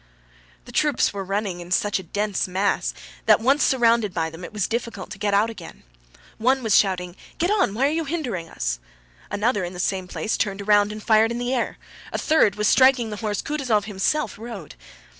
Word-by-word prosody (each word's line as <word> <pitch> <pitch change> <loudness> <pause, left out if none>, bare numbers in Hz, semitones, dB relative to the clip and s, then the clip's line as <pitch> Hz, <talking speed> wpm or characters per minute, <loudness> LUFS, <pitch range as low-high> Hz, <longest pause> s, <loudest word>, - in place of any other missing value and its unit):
The - - -11
troops 295 -8 +2
were 200 -1 -4
running 195 -1 -2
in 175 0 -9
such 200 +2 +1
a 175 -3 -12
dense 205 -2 -1
mass 190 +2 0 0.4
that - - +6
once 270 +6 +3
surrounded 230 -6 +3
by 160 -1 -1
them 165 +2 -10
it - - -7
was 210 -3 -1
difficult 225 -5 -4
to 195 - -8
get 205 -1 +1
out 215 +3 +3
again. 175 -7 -11 0.6
One 260 +3 +2
was 220 -3 +3
shouting, 180 -3 +2 0.2
"Get 345 +4 +1
on! 380 - +2
Why 260 +5 +2
are 285 - +2
you 325 +1 -1
hindering 250 - -3
us?" - - -3 0.5
Another 205 0 0
in 175 +1 -5
the 180 - -8
same 185 0 -1
place 215 +4 -2
turned 200 0 -2
round 205 0 +4
and 215 0 -8
fired 220 0 +4
in 235 - -3
the 245 +1 -2
air; 245 - -1 0.3
a - - -2
third 305 -11 +3
was 210 0 +1
striking 255 -3 +4
the 210 - -5
horse 210 -1 -2
Kutúzov 260 -8 0
himself 215 +5 -1
rode. 220 -9 -8
210 Hz, 205 wpm, -23 LUFS, 190-240 Hz, 0.6 s, that